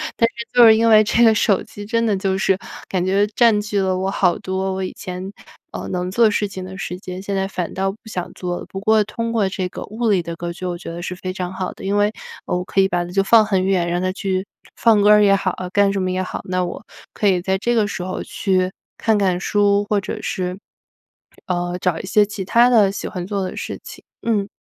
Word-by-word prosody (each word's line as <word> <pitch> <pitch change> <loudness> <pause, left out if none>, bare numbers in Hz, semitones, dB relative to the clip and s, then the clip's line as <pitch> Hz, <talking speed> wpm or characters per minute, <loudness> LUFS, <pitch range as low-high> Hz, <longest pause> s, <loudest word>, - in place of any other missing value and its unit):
但 230 - +3
是 235 0 -8
就 245 -1 +7
是 220 -1 +8
因 230 +1 +3
为 215 -1 +7
这 220 +2 +3
个 225 - +6
手 205 -2 +2
机 205 -2 -10
真 230 +2 0
的 210 - +2
就 190 0 -1
是 190 0 +2 0.3
感 185 -2 -1
觉 195 +2 +3
占 230 -3 +5
据 205 -1 -2
了 190 -1 +1
我 190 +1 -1
好 180 -2 +2
多 190 -1 -2
我 190 0 -3
以 185 - -4
前， 185 +1 -6 0.4
呃， - - -6
能 180 0 -2
做 230 +2 +4
事 205 - 0
情 190 -2 -7
的 190 0 -9
时 180 - -4
间， 185 -1 -7
现 200 0 -3
在 195 0 0
反 180 -3 -4
倒 195 +1 -1
不 200 - -14
想 185 -5 -5
做 175 -1 -3
了。 - - -8
不 195 - -6
过 215 +1 +3
通 230 +2 -4
过 210 -4 +1
这 185 -1 -3
个 - - -8
物 225 +2 -2
理 195 -4 +3
的 170 0 -5
隔 170 +1 -5
绝， 185 +1 -6
我 175 -1 -3
觉 170 - -8
得 170 +1 -6
是 180 +1 -4
非 185 0 -5
常 180 -1 -4
好 185 -1 -4
的， - - -13
因 200 +1 0
为 205 +1 +3 0.3
我 180 0 -1
可 195 - -1
以 190 - +4
把 175 -2 -1
它 175 - -9
就 195 +1 +2
放 220 +2 +6
很 190 -3 +1
远， 185 -3 +1
让 175 +1 0
它 185 0 0
去 190 0 -2 0.3
放 225 -3 +4
歌 205 - +5
儿 210 0 +7
也 200 -1 +5
好 190 -2 -1 0.2
干 200 0 +4
什 195 - -1
么 185 0 -1
也 185 - -1
好， - - -5
那 185 0 -1
我 175 - -5 0.3
可 210 - 0
以 185 -2 +3
在 190 +1 0
这 235 +5 0
个 215 -3 +2
时 190 - -4
候 185 +1 -4
去 185 -2 0 0.3
看 220 -1 +2
看 185 -3 +1
书， 205 +1 +2
或 210 -1 +2
者 - - -5
是， 180 0 -3 0.9
呃， 175 0 -1
找 175 -3 0
一 - - -6
些 210 +2 +4
其 205 -1 -6
他 235 +5 +5
的 215 -5 +5
喜 195 - -5
欢 180 -1 -5
做 200 -1 -2
的 185 - -5
事 - - -5
情， - - -11 0.2
嗯。 210 -4 0
195 Hz, 280 characters per minute, -20 LUFS, 185-210 Hz, 0.9 s, 是